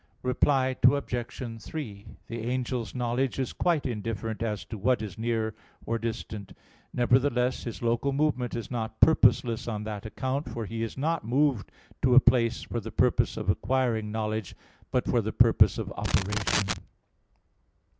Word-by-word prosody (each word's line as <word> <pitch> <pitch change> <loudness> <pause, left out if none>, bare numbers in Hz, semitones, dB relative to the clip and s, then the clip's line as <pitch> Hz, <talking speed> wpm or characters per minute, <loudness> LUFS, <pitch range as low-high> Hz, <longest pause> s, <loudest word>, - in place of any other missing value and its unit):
Reply 130 +1 +2
Obj. 120 -3 0
3: 110 -10 -6 0.2
The 115 0 -5
angel's 125 -2 -2
knowledge 125 +1 0
is 130 -2 -2
quite 170 -5 +1
indifferent 110 -1 -3
as 105 -3 -2
to 110 - -7
what 125 +5 +2
is 100 -4 -6
near 110 -1 -1 0.3
or 115 0 -1
distant. 110 -3 -5 0.4
Nevertheless 125 0 +2
his 120 0 -6
local 120 +4 +1
movement 135 -4 0
is 115 +1 -5
not 110 -2 -4
purposeless 120 -8 +4
on 105 -2 -3
that 105 -1 -5
account: 130 +6 -3
for 115 -2 -4
he 115 +2 -5
is 115 +2 -4
not 160 +4 0
moved 130 -1 +1 0.3
to 125 -2 +4
a - - +11
place 120 -3 +3
for 120 - -3
the 110 0 -7
purpose - - +2
of - - -4
acquiring 115 0 +1
knowledge, 110 -2 -3 0.3
but - - 0
for - - +3
the - - -3
purpose - - +5
of - - -4
operation. 100 0 0
120 Hz, 155 wpm, -28 LUFS, 110-130 Hz, 0.4 s, a